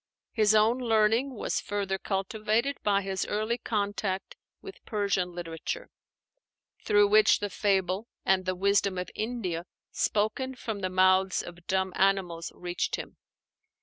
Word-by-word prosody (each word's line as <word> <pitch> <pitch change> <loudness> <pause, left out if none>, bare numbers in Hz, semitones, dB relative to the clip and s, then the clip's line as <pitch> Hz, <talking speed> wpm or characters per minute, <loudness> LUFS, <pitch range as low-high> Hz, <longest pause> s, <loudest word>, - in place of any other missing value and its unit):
His 215 -1 +3
own 220 +4 +4
learning 230 +2 +2
was - - -2
further 195 -2 -2
cultivated 215 +7 -1
by 200 -1 +2
his 190 0 -2
early 220 +3 -1
contact 200 -2 -2 0.2
with 390 - -11
Persian 200 -4 -1
literature; 175 - -5 0.9
through 205 0 +4
which 215 +1 +5
the 205 -1 -4
fable 195 +1 0 0.2
and 190 -1 +2
the 185 0 -1
wisdom 200 0 +2
of 180 - -4
India 190 -7 -3 0.2
spoken 240 +6 0
from 220 -4 -5
the 185 -1 -2
mouths 185 0 +3
of 175 0 -11
dumb 190 -1 0
animals 185 -4 +1
reached 175 0 -2
him. - - -8
200 Hz, 135 wpm, -28 LUFS, 185-215 Hz, 0.9 s, which